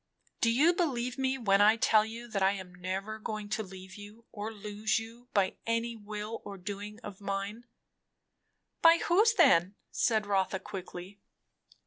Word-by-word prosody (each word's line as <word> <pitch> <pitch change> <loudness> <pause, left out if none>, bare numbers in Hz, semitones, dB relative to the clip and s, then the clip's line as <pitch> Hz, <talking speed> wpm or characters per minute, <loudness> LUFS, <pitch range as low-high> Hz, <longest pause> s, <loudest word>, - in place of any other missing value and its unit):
"You 270 +9 +4
believe 255 -7 -1
me 265 0 +1
when 200 -5 +3
I 215 +2 +6
tell 215 -1 +4
you, 230 +2 -7
that 200 -3 -2
I 190 +1 +4
am 185 -2 -8
never 190 +4 -4
going 215 -1 -5
to 215 +1 -1
leave 190 -2 -10
you 210 +2 -12
or 210 +1 -5
lose 210 +1 -2
you 230 +2 -8
by 195 -3 +1
any 230 +1 0
will 210 +1 -6
or 200 - -8
doing 205 +3 -6
of 205 -3 -9
mine 200 +4 -4 0.6
" - - -51
"By 330 0 +8
whose 425 +7 +4
then?" 180 - +5 0.2
said 220 -3 +1
Rotha 195 -1 +1
quickly. 190 0 -8
210 Hz, 160 wpm, -30 LUFS, 195-230 Hz, 0.6 s, By